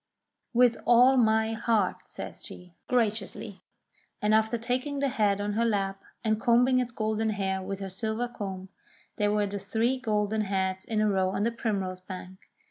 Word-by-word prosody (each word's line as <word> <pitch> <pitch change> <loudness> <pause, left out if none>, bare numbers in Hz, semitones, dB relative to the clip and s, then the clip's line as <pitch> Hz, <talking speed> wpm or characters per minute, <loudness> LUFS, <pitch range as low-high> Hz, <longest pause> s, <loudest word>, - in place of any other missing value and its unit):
"With 245 -1 +4
all 245 +2 +7
my 220 -2 +3
heart," 220 -3 +1
says - - -7
she, 180 -1 -10
graciously, 215 -3 -1 0.6
and 210 +1 +2
after 220 +2 +3
taking 255 +5 -2
the 280 0 +1
head 205 -4 +1
on 205 0 -2
her 225 +3 +1
lap, 195 -3 0 0.2
and 220 -1 +1
combing 250 +2 +4
its 245 -1 -1
golden 220 -1 -1
hair 190 -2 -1
with 195 +1 -5
her 195 - -4
silver 220 +4 -2
comb, 195 -5 -6 0.5
there 205 0 +2
were 210 0 +2
the 200 0 -4
three 230 +6 0
golden 215 -2 0
heads 190 -2 -1
in 215 -2 0
a 215 - +3
row 190 -2 +2
on 195 +2 -1
the 230 - +1
primrose 195 -6 -2
bank. 185 0 -9
215 Hz, 175 wpm, -28 LUFS, 195-235 Hz, 0.6 s, all